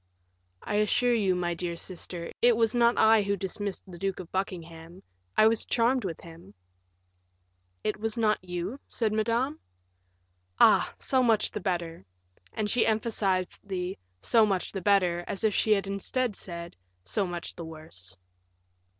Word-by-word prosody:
"I 205 - -1
assure 240 +4 +3
you, 200 -5 +2
my 175 -1 -1
dear 170 0 -3
sister, 170 -1 -5
it 240 -1 +5
was 225 -1 +2
not 235 0 +3
I 220 0 +6
who 200 0 0
dismissed 195 +1 -4
the 175 -2 -11
Duke 195 0 -2
of 180 -2 -9
Buckingham; 170 -1 -5 0.3
I 215 - +7
was 225 0 +3
charmed 240 0 +1
with 170 -4 -4
him." 165 - -13 1.3
"It 215 0 -1
was 220 +1 -3
not 215 -4 +2
you?" 180 +8 -4
said 220 -3 0
Madame; 235 +7 0 1.0
"ah! - - +6
so 260 -1 +1
much 225 -4 +3
the - - -4
better;" 170 - -3 0.5
and 215 - -2
she 230 +3 +3
emphasized 210 -4 0
the 185 -2 -3 0.2
"so 225 - +4
much 195 -4 0
the 195 - -4
better," 180 -3 +3
as 195 - -4
if 215 -2 +3
she 215 - +3
had 200 -1 0
instead 200 +4 -2
said, 170 -2 -7 0.3
"so 185 - 0
much 175 -1 -5
the 170 - -7
worse." 125 - -9
195 Hz, 160 wpm, -28 LUFS, 175-220 Hz, 1.3 s, I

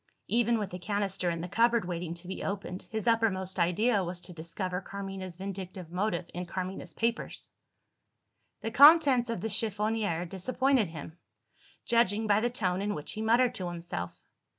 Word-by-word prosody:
(Even 235 0 +3
with 205 -3 -3
the 180 - -6
canister 195 -1 0
in 165 -1 -2
the 175 - -4
cupboard, 235 +2 +3
waiting 170 -1 -4
to 175 +1 -9
be 190 - -5
opened, 195 -2 -4
his 220 -2 -3
uppermost 195 -5 +1
idea 200 +5 +2
was 175 0 -3
to 180 - -6
discover 180 +3 -4
Carmina's 195 -2 -6
vindictive 185 -2 -7
motive 180 -1 -1
in 180 +1 -4
Carmina's 185 -2 -5
papers!) 230 +1 -2 1.1
The 225 - -3
contents 275 -2 +7
of 230 -6 -2
the 225 - -1
chiffonier 210 -4 0
disappointed 255 +5 +1
him 160 +1 -9 0.7
judging 225 -2 +2
by 205 -1 +4
the 240 +2 +1
tone 190 -6 -1
in 205 +1 -1
which 150 - -3
he 215 - -5
muttered 235 +3 +3
to 185 - -4
himself. 170 - -5
195 Hz, 165 wpm, -30 LUFS, 180-225 Hz, 1.1 s, contents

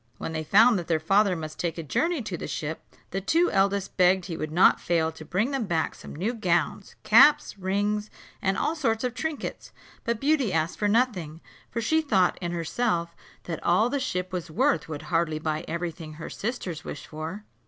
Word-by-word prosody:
When 160 - -5
they 155 0 -2
found 215 +6 +5
that 170 - -7
their 160 -2 +2
father 195 +4 +3
must 155 -2 -7
take 170 -1 -2
a 165 - -4
journey 315 - 0
to 205 -4 -4
the - - -6
ship, 155 +1 -4 0.3
the 195 - -2
two 335 - +2
eldest 195 0 +1
begged 185 0 +4
he 170 - -5
would 155 -1 -4
not 175 +4 +5
fail 165 -2 +1
to 160 0 -11
bring 205 - 0
them 270 -5 -1
back 165 -3 0
some - - -11
new 200 +10 -1
gowns, 180 -3 -1
caps, 270 +7 +6
rings, 205 +3 -1 0.3
and 195 0 +1
all 320 - 0
sorts 230 -7 0
of 250 -2 -1
trinkets. 315 +2 -5 0.3
But 235 -1 -1
Beauty 275 -5 +2
asked 160 0 -1
for 210 - +2
nothing; 205 -9 0 0.3
for 230 - -3
she 315 +8 +2
thought 195 - +2
in 175 -1 -2
herself 170 0 -1 0.3
that 165 -2 -5
all 215 +8 +3
the 280 - 0
ship 180 -8 -2
was 175 -1 -3
worth 155 0 +1
would 155 -1 -5
hardly 165 -2 +1
buy 155 +1 -2
every 170 +1 -2
thing 155 -1 -10
her 160 +2 -8
sisters 195 -8 -4
wished 145 - -7
for. 160 +7 -6
185 Hz, 205 wpm, -26 LUFS, 165-225 Hz, 0.3 s, caps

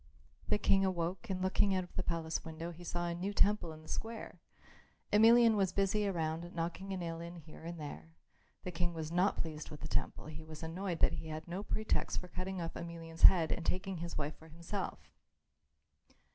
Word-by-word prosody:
The - - +4
King 195 -1 +4
awoke 185 +2 -1
and 185 -1 -1
looking 190 +1 +3
out 185 - +1
of 180 - -14
the - - +1
palace 165 -2 -2
window 165 +1 -5
he 175 +1 -11
saw 175 0 -2
a 170 - -1
new 185 +4 -2
temple 205 -5 +3
in 155 0 -11
the - - -15
square. 225 0 -5 0.7
Emelian 230 +1 +8
was 195 -3 +2
busy 200 +2 +2
around, 170 -1 -2
knocking 175 +4 -3
a 190 - -1
nail 165 -2 -4
in 170 +1 -7
here 160 -2 -12
and 170 0 -5
there. 80 - -8 0.5
The 180 - -3
King 175 0 -1
was 160 -1 -4
not 180 +4 +3
pleased 155 -2 -4
with 150 - -9
the 150 - -4
temple; - - -1
he 155 +1 -7
was 155 0 -9
annoyed 170 +1 -3
that - - +5
he 160 - -5
had 155 +1 -5
no 180 +3 -3
pretext 215 +1 0
for 180 - -9
cutting 185 +1 -3
off 165 -1 -3
Emelian's 165 -1 -7
head 165 -4 +8
and 170 - -1
taking 185 +2 -1
his 170 +1 -4
wife 150 0 -2
for 160 - -14
himself. 170 +5 -5
170 Hz, 205 wpm, -35 LUFS, 160-190 Hz, 0.7 s, Emelian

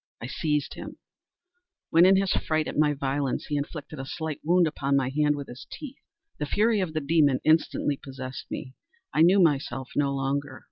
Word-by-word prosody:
I - - -6
seized 150 +2 -1
him; - - -9 0.9
when, 170 +3 +7
in 190 - +6
his 195 -1 +2
fright 155 -1 0
at - - -5
my 150 0 +3
violence, 140 0 -1
he 150 - -3
inflicted 145 +1 -5
a 135 - -4
slight 160 -3 -4
wound 175 +2 +4
upon 140 -3 0
my 135 -2 +2
hand 150 +1 +2
with 140 -1 -6
his 125 +2 -10
teeth. 280 -2 -9 0.4
The 150 - -2
fury 215 +6 +2
of 175 -5 -2
a - - +2
demon 145 -3 +3
instantly 155 -2 +2
possessed 130 -1 -8
me. 130 - -6 0.4
I 155 - +3
knew 180 +4 +6
myself 135 -6 +1
no 140 -1 +2
longer. 135 0 -2
150 Hz, 190 wpm, -26 LUFS, 135-160 Hz, 0.9 s, when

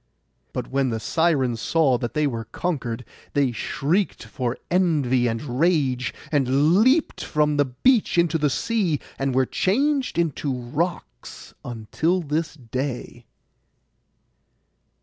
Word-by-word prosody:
But - - -5
when 135 -1 +1
the 115 -1 -2
Sirens 135 -6 +1
saw 145 -7 +2
that 120 - -4
they 150 0 +2
were 115 -5 -2
conquered, 125 -10 -3 0.3
they 140 -3 +2
shrieked 160 - -1
for 125 -1 -3
envy 145 -9 +2
and 120 +3 -3
rage, 145 -7 +2 0.2
and 140 +2 +3
leapt 275 +6 +2
from 150 -1 +1
the 145 - +4
beach 195 - +2
into 170 -1 +3
the 150 -1 +2
sea, 185 - 0 0.2
and 135 -1 0
were 130 0 +4
changed 265 - 0
into 155 -4 0
rocks 130 +8 -4
until 125 +10 -1
this 155 +1 -2
day. 125 -2 -5
145 Hz, 125 wpm, -23 LUFS, 125-170 Hz, 0.3 s, the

